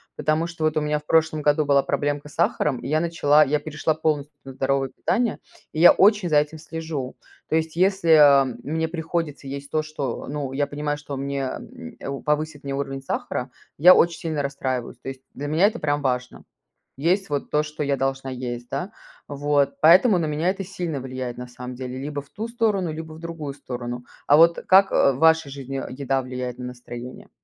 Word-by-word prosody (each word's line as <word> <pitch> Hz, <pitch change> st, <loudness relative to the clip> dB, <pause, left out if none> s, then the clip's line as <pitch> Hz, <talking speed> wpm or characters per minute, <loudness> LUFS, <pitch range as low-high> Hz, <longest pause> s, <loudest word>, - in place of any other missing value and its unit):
Потому 155 Hz, +2 st, 0 dB
что 170 Hz, -2 st, -6 dB
вот 155 Hz, 0 st, +1 dB
у 155 Hz, -, +2 dB
меня 150 Hz, 0 st, 0 dB
в 150 Hz, -, -22 dB
прошлом 160 Hz, -1 st, +2 dB
году 150 Hz, +1 st, +2 dB
была 140 Hz, -1 st, +4 dB
проблемка 145 Hz, 0 st, -2 dB
с 145 Hz, -, -16 dB
сахаром 135 Hz, -5 st, +1 dB
и -, -, -7 dB
я 155 Hz, +3 st, +1 dB
начала 155 Hz, -3 st, +4 dB
я 150 Hz, +1 st, +1 dB
перешла 155 Hz, +1 st, -1 dB
полностью 150 Hz, -2 st, -2 dB
на 135 Hz, -, -8 dB
здоровое 135 Hz, 0 st, 0 dB
питание, 225 Hz, -, -1 dB, 0.3 s
и 155 Hz, -, -3 dB
я 175 Hz, -, +10 dB
очень 205 Hz, -2 st, +4 dB
за 150 Hz, -, +4 dB
этим 150 Hz, +2 st, +1 dB
слежу. 160 Hz, -4 st, -5 dB, 0.3 s
То -, -, +1 dB
есть, 160 Hz, 0 st, -2 dB
если, 190 Hz, -1 st, +2 dB
а, 140 Hz, -3 st, +7 dB, 0.2 s
мне 160 Hz, +2 st, -1 dB
приходится 160 Hz, -3 st, -4 dB
есть 140 Hz, +1 st, -6 dB
то, 155 Hz, -, +1 dB
что 145 Hz, -5 st, -5 dB
ну, 140 Hz, -2 st, -4 dB
я 145 Hz, +1 st, +1 dB
понимаю, 145 Hz, 0 st, -3 dB
что 145 Hz, -1 st, -7 dB
мне, 140 Hz, 0 st, -3 dB
м, 85 Hz, -10 st, -7 dB
э, 140 Hz, 0 st, -5 dB
повысит 150 Hz, -1 st, -1 dB
мне 140 Hz, 0 st, -4 dB
уровень 135 Hz, -1 st, -4 dB
сахара, -, -, -3 dB, 0.3 s
я 180 Hz, +6 st, +9 dB
очень 170 Hz, -1 st, +3 dB
сильно 155 Hz, -3 st, -2 dB
расстраиваюсь. 130 Hz, -3 st, -3 dB
То 135 Hz, -, -7 dB
есть, 135 Hz, -1 st, -8 dB
для 145 Hz, -, -5 dB
меня 160 Hz, +7 st, +4 dB
это 225 Hz, -, -3 dB
прям 145 Hz, -1 st, 0 dB
важно. 125 Hz, -2 st, -2 dB, 0.5 s
Есть 180 Hz, +7 st, +1 dB
вот 145 Hz, -1 st, -2 dB
то, 150 Hz, 0 st, +2 dB
что 150 Hz, 0 st, -7 dB
я 140 Hz, -1 st, +1 dB
должна 135 Hz, 0 st, -2 dB
есть, 120 Hz, -1 st, -5 dB
да. 185 Hz, +3 st, -3 dB, 0.4 s
Вот 145 Hz, 0 st, 0 dB
поэтому 185 Hz, +6 st, +7 dB
на 165 Hz, -, 0 dB
меня 155 Hz, +4 st, 0 dB
это 195 Hz, +1 st, -2 dB
сильно 175 Hz, -5 st, -4 dB
влияет, 130 Hz, -1 st, -5 dB
на 125 Hz, 0 st, -7 dB
самом 125 Hz, +1 st, -8 dB
деле 130 Hz, 0 st, -6 dB
либо 145 Hz, +1 st, -4 dB
в 140 Hz, -, -21 dB
ту 215 Hz, +10 st, -5 dB
сторону, 215 Hz, -7 st, 0 dB
либо 160 Hz, 0 st, -7 dB
в 155 Hz, -, -11 dB
другую 165 Hz, -4 st, -6 dB
сторону. 120 Hz, -3 st, -6 dB, 0.2 s
А 145 Hz, -, +6 dB
вот 165 Hz, +1 st, +6 dB
как, 195 Hz, +1 st, +6 dB
э, 140 Hz, -, +4 dB
в -, -, -6 dB
вашей 160 Hz, -2 st, +4 dB
жизни 135 Hz, -1 st, -5 dB
еда 135 Hz, 0 st, -1 dB
влияет 125 Hz, -1 st, -5 dB
на 125 Hz, -, -5 dB
настроение? 125 Hz, 0 st, -9 dB
145 Hz, 210 wpm, -23 LUFS, 135-160 Hz, 0.5 s, я